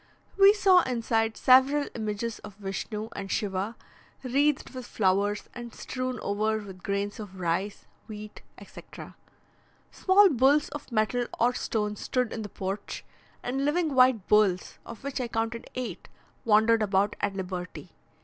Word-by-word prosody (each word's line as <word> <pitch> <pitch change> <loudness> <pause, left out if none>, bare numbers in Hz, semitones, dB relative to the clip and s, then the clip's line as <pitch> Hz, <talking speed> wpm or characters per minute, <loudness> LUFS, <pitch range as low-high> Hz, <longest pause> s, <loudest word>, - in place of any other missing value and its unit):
We 395 0 +8
saw 380 -3 +5
inside 225 -4 -1
several 265 +3 +5
images 215 +1 -3
of 210 -2 -11
Vishnu 210 +2 -5
and 195 -1 -6
Shiva, 200 +1 -2 0.5
wreathed 280 +3 +1
with 255 -2 -8
flowers, 200 +1 0
and 240 -1 -9
strewn 255 -2 -4
over 215 +2 0
with 195 -3 -9
grains 200 +2 -2
of 190 -3 -9
rice, 185 +4 -2 0.2
wheat, 215 -1 -9 0.2
etc. - - -12 0.8
Small 390 +1 +5
bulls 280 +2 +3
of 290 -2 -9
metal 235 +2 0
or 245 +2 +3
stone 210 -3 -2
stood 250 +3 -2
in 225 - -4
the 210 - -6
porch, 195 +2 -5 0.4
and 265 +3 -2
living 310 +1 +1
white 255 -6 +4
bulls 205 -4 +2
(of 235 +3 -10
which 275 -1 -3
I 245 - -2
counted 230 0 -3
eight) 230 -8 -5 0.4
wandered 220 +1 +4
about 200 -1 +1
at 195 - -1
liberty. 180 -1 -6
220 Hz, 145 wpm, -27 LUFS, 205-255 Hz, 0.8 s, We